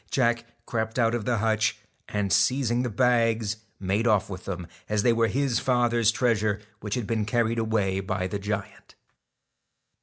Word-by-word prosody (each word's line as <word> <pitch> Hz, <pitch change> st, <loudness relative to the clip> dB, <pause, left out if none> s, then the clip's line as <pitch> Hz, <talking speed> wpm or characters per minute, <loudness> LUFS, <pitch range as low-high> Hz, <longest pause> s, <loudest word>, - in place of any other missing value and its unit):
Jack 120 Hz, -2 st, +1 dB, 0.2 s
crept 110 Hz, 0 st, -2 dB
out 115 Hz, -2 st, +3 dB
of 120 Hz, -3 st, -2 dB
the 120 Hz, 0 st, +1 dB
hutch, 110 Hz, +1 st, +1 dB, 0.3 s
and, 100 Hz, -3 st, 0 dB
seizing 125 Hz, +1 st, +2 dB
the 125 Hz, -, -1 dB
bags, 115 Hz, -2 st, +2 dB, 0.2 s
made 100 Hz, +5 st, 0 dB
off 105 Hz, -3 st, +2 dB
with 95 Hz, -1 st, -7 dB
them, 90 Hz, -2 st, -4 dB, 0.2 s
as 105 Hz, -1 st, +1 dB
they 120 Hz, -, +4 dB
were 115 Hz, 0 st, +2 dB
his 130 Hz, -1 st, 0 dB
father's 120 Hz, -3 st, +2 dB
treasure 110 Hz, -3 st, +1 dB, 0.2 s
which 105 Hz, -1 st, -3 dB
had 125 Hz, -4 st, -2 dB
been 110 Hz, 0 st, 0 dB
carried 115 Hz, +1 st, +1 dB
away 105 Hz, -4 st, 0 dB
by 95 Hz, -1 st, -2 dB
the 100 Hz, +2 st, -3 dB
giant. 100 Hz, 0 st, -5 dB
110 Hz, 170 wpm, -26 LUFS, 105-120 Hz, 0.3 s, they